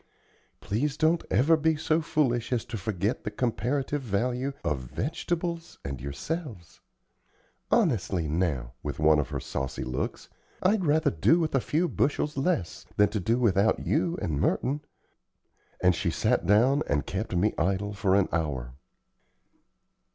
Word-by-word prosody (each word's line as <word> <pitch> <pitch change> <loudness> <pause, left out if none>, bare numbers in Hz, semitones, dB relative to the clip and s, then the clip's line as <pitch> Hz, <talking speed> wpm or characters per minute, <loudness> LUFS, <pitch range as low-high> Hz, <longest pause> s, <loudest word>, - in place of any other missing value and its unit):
Please 135 +8 -1
don't 160 +2 +2
ever 130 - +4
be 160 0 +2
so 155 +2 +1
foolish 130 -7 0
as 120 -3 0
to 120 - -6
forget 105 +1 -2
the - - -2
comparative 125 +5 -1
value 125 +4 -1
of 75 -3 0
vegetables 165 - -3
and 70 -2 -5
yourselves. 90 - -6 0.9
Honestly 105 - +1
now" 75 -7 -1
(with - - -4
one 75 0 +4
of 70 - -2
her - - -3
saucy 65 -1 -4
looks), 65 +1 -4 0.4
"I'd 190 0 +3
rather 150 0 +3
do 165 +5 +3
with 160 -2 -1
a 135 - +4
few 165 +8 +1
bushels 150 -1 0
less, 135 - -1
than 105 0 +5
do 110 +3 0
without 110 -3 +2
you 170 +2 +1
and 80 -8 -2
Merton;" 145 +3 0 1.0
and 90 0 +6
she - - -1
sat - - +1
down 125 +8 +4
and 75 0 0
kept 95 0 -3
me 100 +5 +2
idle 95 +4 0
for 95 -1 +2
an 100 -2 +3
hour. 70 -7 -2
115 Hz, 145 wpm, -28 LUFS, 90-150 Hz, 1.0 s, and